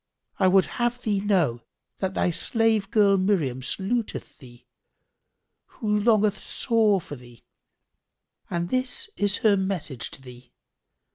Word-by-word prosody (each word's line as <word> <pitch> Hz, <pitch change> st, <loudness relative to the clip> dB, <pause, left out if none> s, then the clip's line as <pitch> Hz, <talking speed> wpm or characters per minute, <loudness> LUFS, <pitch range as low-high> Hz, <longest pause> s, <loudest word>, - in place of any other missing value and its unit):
I 190 Hz, -, +4 dB
would 190 Hz, 0 st, +5 dB, 0.2 s
have 240 Hz, +1 st, 0 dB
thee 205 Hz, -3 st, 0 dB
know 180 Hz, -, +1 dB, 0.4 s
that 190 Hz, -1 st, -2 dB
thy 180 Hz, -, +1 dB
slavegirl 210 Hz, -1 st, +2 dB
Miriam 165 Hz, -10 st, 0 dB
saluteth 205 Hz, -, -3 dB
thee, 120 Hz, -4 st, -16 dB, 1.1 s
who 210 Hz, -3 st, 0 dB
longeth 215 Hz, -2 st, +2 dB
sore 220 Hz, -5 st, +2 dB
for 150 Hz, -, -9 dB
thee; 120 Hz, -2 st, -16 dB, 1.1 s
and 175 Hz, 0 st, -2 dB
this 260 Hz, -, -3 dB
is 205 Hz, 0 st, +1 dB
her 210 Hz, -2 st, +6 dB
message 190 Hz, -10 st, -3 dB
to -, -, -12 dB
thee. 125 Hz, -1 st, -14 dB
195 Hz, 125 wpm, -25 LUFS, 160-215 Hz, 1.1 s, her